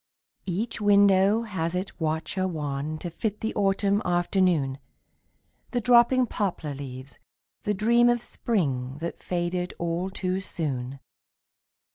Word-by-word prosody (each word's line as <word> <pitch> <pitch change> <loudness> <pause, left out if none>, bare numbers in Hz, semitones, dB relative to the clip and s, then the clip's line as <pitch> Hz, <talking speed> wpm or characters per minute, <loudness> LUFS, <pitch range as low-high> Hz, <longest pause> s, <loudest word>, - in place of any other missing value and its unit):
Each 210 +6 -2
window 200 +1 +5
has 180 -6 -3
its 185 +2 -4
watcher 160 +4 -1
wan 150 -2 -3
To 170 +2 -6
fit 210 +4 -3
the 220 - -2
autumn 200 0 +2
afternoon, 175 -6 +1 0.9
The 245 - 0
dropping 245 +2 +5
poplar 185 -9 -2
leaves, 130 -1 -8 0.5
the 210 - +1
dream 235 +4 +4
Of 240 -1 +1
spring 135 - -1
that 170 +1 -5
faded 180 0 -2
all 170 +2 -2
too 185 -1 -2
soon. 140 -8 -3
185 Hz, 120 wpm, -26 LUFS, 155-205 Hz, 0.9 s, window